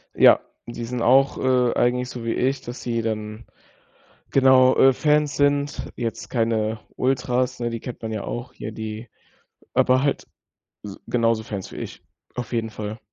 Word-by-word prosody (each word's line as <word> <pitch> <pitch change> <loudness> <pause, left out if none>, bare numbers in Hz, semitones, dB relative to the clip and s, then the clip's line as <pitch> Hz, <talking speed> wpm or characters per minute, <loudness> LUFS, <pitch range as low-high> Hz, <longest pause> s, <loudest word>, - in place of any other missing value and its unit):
Ja, - - +7 0.3
die 120 0 -6
sind 125 0 -4
auch, 135 +3 +4
äh, 125 -2 +2
eigentlich 125 +1 +1
so 120 -2 -7
wie 115 - 0
ich, 135 +2 0
dass 120 +1 -8
sie 115 -1 -1
dann 110 0 -4 0.9
genau, 130 -1 +5
äh, 135 - +6
Fans 150 +2 +1
sind. 145 0 0
Jetzt 115 -1 -4
keine 110 -2 0 0.2
Ultras, 125 -1 0
ne, 120 0 -1
die 115 -1 -4
kennt 125 - -8
man 110 0 -4
ja 105 - -4
auch. 120 +1 -5
Hier 110 - -7
die 110 +1 -6 0.7
aber 130 +1 +3
halt 140 - -1 0.6
s 100 -1 -8
genauso 115 -2 +1
Fans 100 -4 -6
wie - - -9
ich. - - -7 0.3
Auf 125 -1 -5
jeden 115 -1 -1
Fall. 110 +1 -6
120 Hz, 170 wpm, -23 LUFS, 110-130 Hz, 0.9 s, Ja